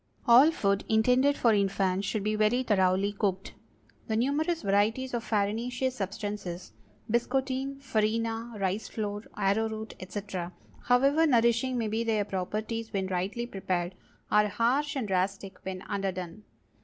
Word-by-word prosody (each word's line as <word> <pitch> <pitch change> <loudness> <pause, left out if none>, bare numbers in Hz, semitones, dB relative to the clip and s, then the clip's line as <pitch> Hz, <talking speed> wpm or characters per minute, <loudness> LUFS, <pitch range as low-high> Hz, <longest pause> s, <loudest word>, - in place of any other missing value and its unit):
All 250 +6 +8
food 200 -10 0
intended 250 +6 +3
for 230 -2 +4
infants 195 -1 +1
should 215 -3 -1
be 215 +1 0
very 215 +4 +2
thoroughly 195 -2 +2
cooked. 195 -2 -2 0.5
The 220 - -1
numerous 300 +8 0
varieties 220 +6 +1
of 235 -1 -1
farinaceous 240 +5 -1
substances—biscotine, 210 - -3
farina, 225 0 -1
rice 195 +2 -1
flour, 210 -1 -4
arrowroot, 220 +2 0
etc., 185 -2 -5 0.3
however 275 +6 +4
nourishing 235 0 +3
may 230 -2 0
be 220 +2 -1
their 215 -3 +1
properties 215 +4 -3
when 195 -2 -1
rightly 190 +6 -2
prepared, 185 -5 -2 0.4
are 210 0 +5
harsh 260 +7 +1
and 255 -6 -2
drastic 195 0 -2
when 190 -1 -5
underdone. 195 -1 -4
215 Hz, 130 wpm, -29 LUFS, 195-240 Hz, 0.5 s, All